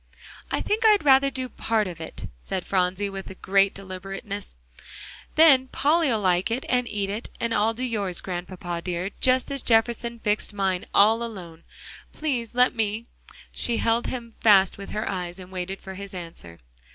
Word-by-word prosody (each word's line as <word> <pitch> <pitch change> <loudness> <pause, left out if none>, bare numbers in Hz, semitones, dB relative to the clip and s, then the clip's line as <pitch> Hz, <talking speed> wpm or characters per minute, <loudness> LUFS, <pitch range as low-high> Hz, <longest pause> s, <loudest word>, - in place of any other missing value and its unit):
"I - - -1
think 435 +3 0
I'd 420 -6 +5
rather 275 0 +6
do 260 -1 -4
part 225 -3 0
of 175 -3 -7
it," 160 - -7 0.2
said 185 -2 -4
Phronsie 190 +1 0
with 195 -1 -8
great 195 +1 +3
deliberateness, 195 - -7 0.8
"then 280 -5 +6
Polly'll 290 -4 +2
like 185 -1 +2
it, 240 +4 -2
and 250 -1 +1
eat 200 -2 -2
it, 215 +3 -5
and 235 -1 -1
I'll 225 +1 +2
do 250 - -3
yours, 205 -7 -2
Grandpapa 175 -1 -5
dear, 180 +2 -3
just 255 +2 +2
as 275 -1 -2
Jefferson 235 +1 +1
fixed 210 -1 -1
mine, 190 -2 -1
all 220 +3 +5
alone. 180 -8 -7 0.5
Please 250 -7 -3
let 250 +1 +4
me." 220 0 -1 0.5
She 235 -1 +1
held 230 +1 +1
him 235 -3 -5
fast 195 -4 +5
with 200 - -8
her 215 +2 -3
eyes, 180 -2 -4
and 185 -1 -11
waited 190 +1 -4
for 190 - -9
his 200 0 -9
answer. 165 - -9
205 Hz, 170 wpm, -25 LUFS, 190-235 Hz, 0.8 s, rather